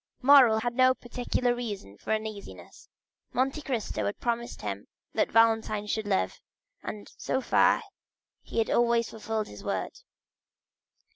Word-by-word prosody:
Morrel 255 -5 +7
had 240 +1 -1
no 255 +1 +4
particular 245 0 -1
reason 210 - -6
for 105 - -6
uneasiness; 215 -2 -6 0.4
Monte 270 +4 0
Cristo 230 - -2
had 100 - -4
promised 235 0 -3
him - - -4 0.3
that - - +1
Valentine 225 -2 +3
should 215 0 -2
live, 95 - 0 0.4
and 210 -1 -7
so 260 - -1
far 265 - +3 0.6
he - - -8
had 225 - +1
always 235 -1 +2
fulfilled 220 -1 -3
his - - -11
word. - - -3
230 Hz, 135 wpm, -28 LUFS, 215-245 Hz, 0.6 s, Morrel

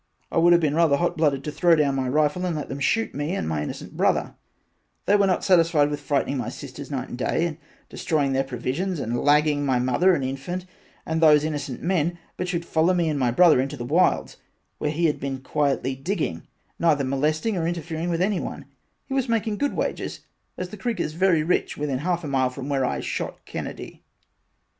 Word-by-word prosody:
I - - +2
would 170 +1 +5
have 170 - +6
been 155 -4 +1
rather 160 -3 +3
hot 175 +2 0
blooded 145 -4 +1
to 150 - -4
throw 170 +3 +4
down 145 -3 +2
my 130 -1 -1
rifle 150 +5 +1
and 175 -3 -1
let 150 - -5
them 135 - -5
shoot 225 +11 +1
me 145 +6 -2
and - - -2
my 80 -2 -1
innocent 75 - -6
brother, - - +1 0.7
they 205 - +4
were 200 -1 +4
not 185 - +1
satisfied 165 -5 +4
with 145 - -3
frightening 140 -1 -1
my 120 - -3
sisters 140 0 -9
night 135 -3 -4
and - - -6
day 165 +6 +1
and 160 -3 -4 0.3
destroying 145 -5 -1
their 135 0 +2
provisions 135 +8 -3
and 120 -2 -2
lagging 150 0 +3
my 130 -3 +2
mother 130 +10 +3
and 140 - -2
infant 135 +8 -4 0.4
and 160 0 -1
those 150 -2 +6
innocent 145 -4 -4
men 175 -1 0 0.2
but 180 - -3
should 170 -1 -2
follow 170 +3 +2
me 170 -2 +1
and 150 -2 -1
my 125 -2 +2
brother 155 +1 +5
into 140 +2 -4
the 120 - -5
wilds - - +1 0.4
where 150 - 0
he 160 +3 0
had 150 - +1
been 135 -1 -3
quietly 135 -1 0
digging 135 - -3 0.3
neither 155 -4 +3
molesting 155 +10 0
or 165 -2 -1
inter 170 0 -2
fering 165 +2 -4
with 170 +1 +1
anyone 200 -1 -2 0.4
he 270 - -6
was 265 -2 0
making 225 -2 0
good 285 +6 -1
wages - - -3 0.4
as 180 0 -4
the 210 - -9
creek 235 +4 -3
is 150 - -2
very 170 -2 +3
rich 175 +3 0
within 145 -3 -2
half 175 +3 -1
a - - -4
mile 130 -2 +1
from 130 +2 -7
where 135 -2 +1
I 125 - -1
shot - - -4
Kennedy. - - -7
150 Hz, 215 wpm, -24 LUFS, 135-175 Hz, 0.7 s, have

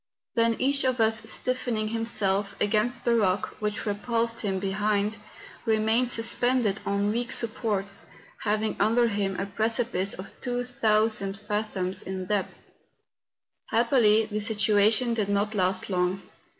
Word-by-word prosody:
Then 230 -1 +2
each 275 +3 +1
of 255 -2 0
us 220 0 +2
stiffen¬ 245 +1 -1
ing 215 0 -1
himself 205 -3 -1
against 215 +4 0
the 235 - +3
rock 200 -3 +1
which 210 +1 -2
repulsed 230 +2 -1
him 195 -3 -1
behind, 205 +2 -1 0.4
remained 225 +2 +2
suspended 230 -2 +1
on 200 +1 +1
weak 240 +2 -2
supports, 205 -4 +1 0.4
hav¬ 215 0 0
ing 220 - -2
under 230 +3 +3
him 200 -2 -2
a 195 - -1
precipice 220 -1 0
of 185 - -11
2000 220 -5 0
fathoms 205 -3 -2
in 190 -1 -5
depth. 205 0 -4 0.9
Happily 225 -2 +3
this 210 0 -1
situation 215 +2 +3
did 210 -3 -1
not 205 +1 0
last 185 -2 0
long. 185 0 -1
215 Hz, 135 wpm, -26 LUFS, 200-230 Hz, 0.9 s, the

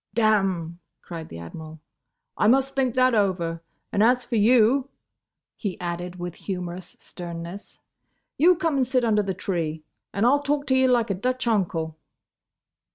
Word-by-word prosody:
"Damme!" 195 -7 +1 0.2
cried 165 -2 -7
the 80 - -8
Admiral. 155 - -9 0.6
"I 210 - +2
must 270 +3 +3
think 260 -3 +1
that 255 0 +4
over. 180 -6 0 0.3
And 205 - +1
as 245 +2 +4
for 240 - -3
you," 245 +4 +4 0.7
he 200 -5 -4
added, 175 0 -4
with 175 -1 -5
humorous 180 -2 -5
sternness, 170 +2 -8 0.6
"you 355 +4 +5
come 330 -4 0
and 260 -2 +2
sit 255 -1 +1
under 210 -2 +3
the 195 -2 -3
tree 160 -4 -3 0.3
and 200 +3 0
I - - +6
'll 285 +2 +4
talk 285 0 -1
to 260 - +2
you 260 0 +4
like 235 -4 +2
a - - +2
Dutch 255 +7 -2
uncle." 165 -8 -1
205 Hz, 160 wpm, -25 LUFS, 175-255 Hz, 0.7 s, I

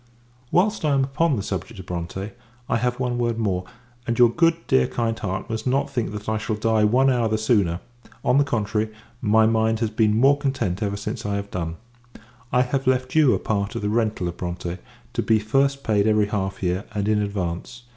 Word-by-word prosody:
Whilst 205 +2 +2
I 150 -2 +2
am 135 - +3
upon 140 +3 +1
the 100 - -3
subject 95 +2 -5
of 95 - -8
Bronte, 90 +3 -5 0.4
I 115 - +1
have 125 +1 -1
one 125 -1 -1
word 120 -1 0
more 95 -5 -1 0.4
and 115 0 0
your 120 -2 +6
good, 165 +5 +3
dear, 65 0 +3
kind 115 -1 -1
heart, 95 +1 -3
must 110 +1 -4
not 135 +2 +1
think 120 -4 -2
that 105 0 -7
I 110 0 0
shall 110 0 -2
die 110 0 +2
one 130 +5 +4
hour 120 -3 +1
the 110 0 0
sooner; 100 -6 +1 0.4
on 135 - +4
the - - +5
contrary, 110 -4 -1 0.3
my 110 0 +4
mind 110 0 +2
has 110 -2 -1
been 110 -1 +2
more 140 +3 +5
content 130 -9 -1
ever 100 -1 -1
since 105 +3 -5
I 105 -1 -1
have 100 0 -4
done: 85 -2 -3 0.8
I 125 - +4
have 135 +1 -2
left 130 0 +1
you 150 -5 +5
a - - 0
part 100 -1 -2
of - - -3
the 105 - 0
rental 110 -4 0
of 85 - -5
Bronte, 90 0 -4 0.3
to - - 0
be 110 - +3
first 135 +6 +1
paid 105 -1 +2
every 105 -1 +3
half 95 -2 -3
year, 90 +2 0
and 100 0 -1
in 105 -1 +2
advance. 100 +3 -4
110 Hz, 215 wpm, -23 LUFS, 100-125 Hz, 0.8 s, your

